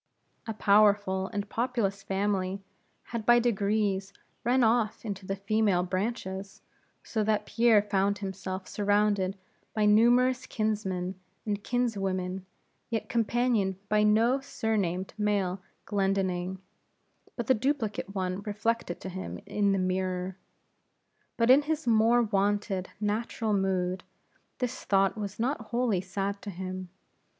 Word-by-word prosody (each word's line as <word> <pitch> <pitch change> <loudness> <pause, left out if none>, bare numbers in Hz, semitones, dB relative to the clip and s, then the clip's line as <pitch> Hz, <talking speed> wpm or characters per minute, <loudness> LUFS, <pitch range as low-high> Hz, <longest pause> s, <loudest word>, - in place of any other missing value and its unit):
A 225 - -3
powerful 205 -2 +3
and 205 -1 -4
populous 225 -4 -1
family 195 -1 -1 0.5
had 230 -2 -2
by 240 +2 +6
degrees 205 -4 +1 0.3
run 245 +2 +3
off 225 -1 +1
into 200 -3 -5
the 195 - -1
female 200 -2 +1
branches; 190 0 -4 0.4
so 220 -2 -1
that 215 0 +1
Pierre 230 -3 +4
found 200 0 +1
himself 190 -1 -5
surrounded 205 -2 +1 0.4
by 215 -1 +2
numerous 245 +4 +4
kinsmen 190 -4 -2 0.3
and 205 -1 -2
kinswomen, 195 -6 -1 0.4
yet 225 -2 -3
companioned 230 -4 +1
by 210 0 +3
no 225 +5 +4
surnamed 200 -8 -2
male 200 -3 0 0.2
Glendinning, 190 -2 0 0.8
but 235 - -3
the 260 - +5
duplicate 225 -5 -2
one 185 0 -2
reflected 210 -2 -2
to 190 - -5
him 190 +1 -6
in 205 -1 +1
the 195 - +2
mirror. 185 0 -1 1.0
But 230 +1 +5
in 275 +3 +7
his 310 +1 -2
more 230 +1 +4
wonted 200 -2 0
natural 215 +1 -1
mood, 185 -2 0 0.5
this 250 0 -3
thought 195 0 +2
was 205 -2 -5
not 260 +6 0
wholly 235 -6 +1
sad 195 +2 -3
to - - -6
him. 185 0 -6
205 Hz, 125 wpm, -29 LUFS, 190-225 Hz, 1.0 s, in